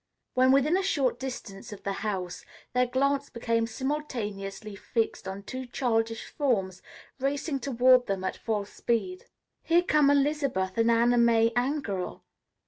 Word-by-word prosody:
When 255 +1 +4
within 275 +5 +4
a - - +1
short 285 -9 0
distance 245 -5 -7
of 205 - -9
the 200 - -2
house, 185 -4 -3 0.3
their 250 0 +3
glance 275 +2 0
became 230 -1 0
simultaneously 215 -7 -4
fixed 220 0 -2
on 195 +1 -6
two 255 +4 -6
childish 225 -2 -1
forms 195 -10 -1 0.4
racing 275 +2 -1
toward 255 -1 +4
them 195 -1 -2
at 185 - -2
full 210 -3 -2
speed. 365 - -2 0.4
"Here 340 +1 +3
come 300 -4 +4
Elizabeth 280 -10 +1
and 230 0 +4
Anna 235 +1 +4
May 230 -1 +4
Angerell." 245 -8 -2
240 Hz, 140 wpm, -28 LUFS, 210-275 Hz, 0.4 s, When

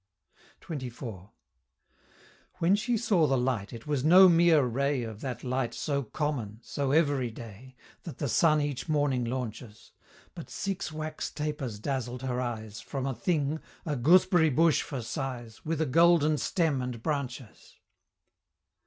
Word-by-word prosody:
XXIV. 120 - -7 1.3
When 180 +2 +3
she 235 +3 0
saw 195 -8 +2
the 135 -1 +2
light, 125 -5 -1
it 115 -1 -9
was 145 -3 -1
no 185 +5 +8
mere 170 -3 +5
ray 135 +2 0
Of 110 -2 -7
that 125 -3 -5
light 130 -1 -2
so 140 -2 -1
common 125 -5 -3
so 140 -2 -2
everyday 130 -5 -1 0.3
That 165 - -9
the 145 - -2
sun 155 +5 +3
each 145 +1 -3
morning 145 -4 +1
launches 115 -3 -6 0.4
But - - -9
six 195 -5 -3
wax 155 0 -4
tapers 150 -7 -4
dazzled 125 +1 -3
her 125 -1 -1
eyes, 110 -3 -5
From 135 +1 -4
a 135 - -1
thing 150 +4 -1 0.3
a 150 -3 -1
gooseberry 170 +4 +4
bush 155 +1 +3
for 130 -4 -5
size 120 -3 -5
With 160 0 -2
a 160 - +2
golden 155 0 +4
stem 160 -7 0
and 125 -2 -5
branches. 135 -6 -5
140 Hz, 145 wpm, -29 LUFS, 120-155 Hz, 1.3 s, no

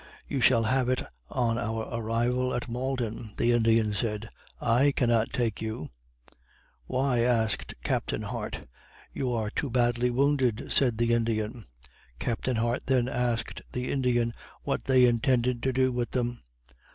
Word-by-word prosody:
You 135 - -2
shall 115 -1 +5
have 125 +2 +1
it 130 - +1 0.3
on 120 -2 0
our 115 -1 -2
arrival 120 +3 0
at 120 - -3
Malden." 120 -3 -3
The 120 - +3
Indian 115 -2 +3
said, 105 +1 -2 0.3
"I 125 +5 +3
cannot 115 -4 +2
take 115 -4 -1
you." 110 - -4 1.0
"Why?" 130 -1 +1
asked 115 -3 +1
Captain - - -1
Hart. - - -4 0.5
"You 130 -2 -1
are 110 -3 -1
too 145 - -2
badly 120 0 +2
wounded," 130 -3 +1
said 125 -5 +3
the 115 0 +2
Indian. 115 -1 -1 0.5
Captain 120 - -1
Hart 115 +2 -1
then 130 -2 +2
asked 120 -2 -1
the 125 0 -2
Indian, 120 -3 +1 0.3
what - - -2
they 130 -1 +5
intended 120 0 +2
to 130 - +1
do 130 0 +2
with 120 -1 -2
them? 120 -1 -2
120 Hz, 145 wpm, -28 LUFS, 115-125 Hz, 1.0 s, shall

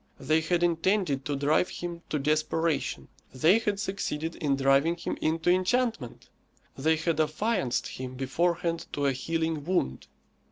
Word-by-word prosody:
They 155 +1 +2
had 175 +2 0
intended 170 -4 +1
to 145 - -1
drive 145 +5 +2
him 170 -1 -6
to 155 - 0
desperation; 155 +2 0 0.2
they 160 - +4
had 210 -3 -1
succeeded 165 -5 -3
in 140 -2 +1
driving 135 +5 +3
him 170 - -4
into 165 +2 +1
enchantment. 185 - 0 0.5
They 160 +4 +2
had 160 0 -1
affianced 155 - 0
him 130 0 -7
beforehand 170 +6 -1
to 145 - -1
a 140 - +3
healing 160 +2 -2
wound. 175 - -1
160 Hz, 145 wpm, -28 LUFS, 145-175 Hz, 0.5 s, they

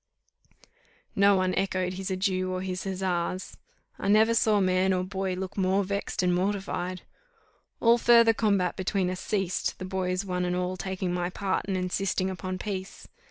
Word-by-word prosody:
_" - - -28 0.5
No 200 0 +5
one 185 -1 +1
echoed 185 -1 -1
his 190 +1 -5
adieu 185 -1 0
or 185 0 -3
his 185 0 -4
huzzas. 185 -1 -2 0.4
I - - -3
never 220 +3 +5
saw 220 -2 +3
man 185 0 +2
or 180 0 0
boy 190 0 -3
look 185 0 -5
more 190 +1 +2
vexed 200 0 -2
and 180 0 +2
mortified. 185 -1 -2 0.8
All 235 +1 +5
further 235 -1 +6
combat 200 -5 +1
between 190 -1 0
us 185 - -5
ceased, 195 -4 -1
the 185 - -6
boys 185 0 -2
one 180 -1 -2
and 180 0 0
all 180 0 -1
taking 185 -1 -3
my 175 0 -1
part 190 0 -2
and 190 -2 0
insisting 185 +1 -1
upon 185 +1 -4
peace. 190 -1 -6
185 Hz, 170 wpm, -27 LUFS, 185-195 Hz, 0.8 s, further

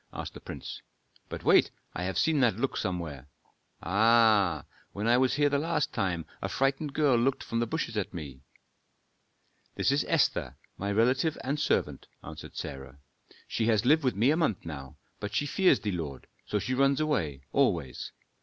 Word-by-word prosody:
asked - - -6
the - - -10
prince. - - -8 0.5
"But - - -6
wait - - +5 0.2
I 90 - -3
have 95 - -2
seen 160 -2 +2
that 120 -6 +3
look 135 +3 -1
somewhere. 80 -7 -4 0.6
Ah! 105 - +4 0.3
when 100 +2 -3
I 120 +1 +5
was 130 -1 +2
here 145 0 +3
the 140 0 +1
last 155 -1 -1
time 85 -4 -1 0.2
a 95 - -2
frightened 135 +8 0
girl 145 -5 +4
looked 130 +3 +1
from 115 - -2
the 120 - 0
bushes 115 -3 -3
at 105 -3 -2
me." 70 -7 -8 1.3
"This - - +2
is 140 +1 +2
Esther, - - +1 0.2
my 100 +1 -3
relative 130 +9 +2
and 140 +3 -1
servant," - - 0 0.2
answered - - -10
Sarah. 65 0 -7 0.5
"She 115 - -1
has 110 -1 +2
lived 155 +4 +4
with 130 - +1
me 115 +8 +3
a 155 - +2
month 155 - 0
now, 70 -5 -8 0.2
but 105 0 -5
she 145 - +1
fears 185 +6 +3
thee, 105 - -1
lord, 75 -7 -5 0.2
so 105 - 0
she 125 +5 -2
runs 135 +1 +3
away 80 - -1
always. 85 - 0
115 Hz, 180 wpm, -29 LUFS, 90-140 Hz, 1.3 s, wait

